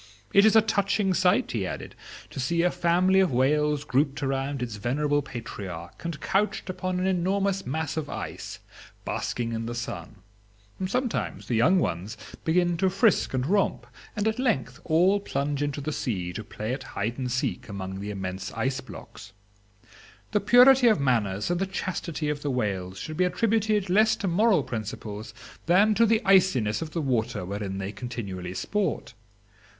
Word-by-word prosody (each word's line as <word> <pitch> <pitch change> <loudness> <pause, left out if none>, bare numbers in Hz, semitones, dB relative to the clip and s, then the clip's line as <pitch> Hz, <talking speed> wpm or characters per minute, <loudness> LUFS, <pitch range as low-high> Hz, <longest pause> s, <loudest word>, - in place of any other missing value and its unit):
It 200 +1 +7
is 220 - +4
a 220 - +7
touching 200 -2 +1
sight," 180 0 +2
he 100 -5 -1
added, - - -6 0.4
"to - - -6
see 170 +6 +1
a 180 - +3
family 180 +3 +3
of 190 -5 +3
whales 150 +3 +2
grouped 140 +1 0
around 135 0 -1
its 115 -4 -5
venerable 145 +7 0
patriarch, 100 -10 -8
and 170 -3 -4
couched 200 -1 0
upon 185 0 -3
an 185 - 0
enormous 190 +1 0
mass 160 +3 -2
of 155 -2 -3
ice, - - -6 0.5
basking 115 -1 -2
in 115 0 -3
the 120 - -4
sun. 105 -5 -6 0.7
Sometimes 250 +4 -2
the - - -2
young 145 +12 +4
ones 105 - -2 0.3
begin 175 +1 +2
to 190 +2 +2
frisk 195 - +2
and 130 0 0
romp, 195 +5 +1 0.3
and 210 0 0
at 220 +2 0
length 130 - 0
all 180 +5 +4
plunge 145 -6 -2
into 145 0 -2
the 155 +2 -3
sea 90 -11 -3
to 110 - -5
play 110 +2 -4
at 135 - -4 0.2
hide 115 +6 -2
and 125 -1 -2
seek 125 -1 -2
among 95 -1 -5
the 100 +1 -5
immense 95 -1 -4
ice 130 +4 -1
blocks. 105 0 -11 1.0
The 210 - +3
purity 250 +4 +7
of 215 -8 +4
manners 110 - +1
and 175 - 0
the 195 - 0
chastity 170 -5 -3
of 150 -1 -2
the 145 - -2
whales 95 -7 -2
should 155 - -6
be 185 - +3
attributed 210 +1 +1
less 215 +4 +4
to 210 -3 -3
moral 190 -2 +3
principles 110 -2 -6 0.4
than 200 +5 +5
to 230 +2 +4
the 220 0 +2
iciness 185 - +3
of 160 - -4
the 165 +1 -3
water 120 -7 -1
wherein 100 0 -4
they 95 +1 -4
continually 100 -6 -6
sport. 205 - -2
145 Hz, 175 wpm, -26 LUFS, 115-190 Hz, 1.0 s, It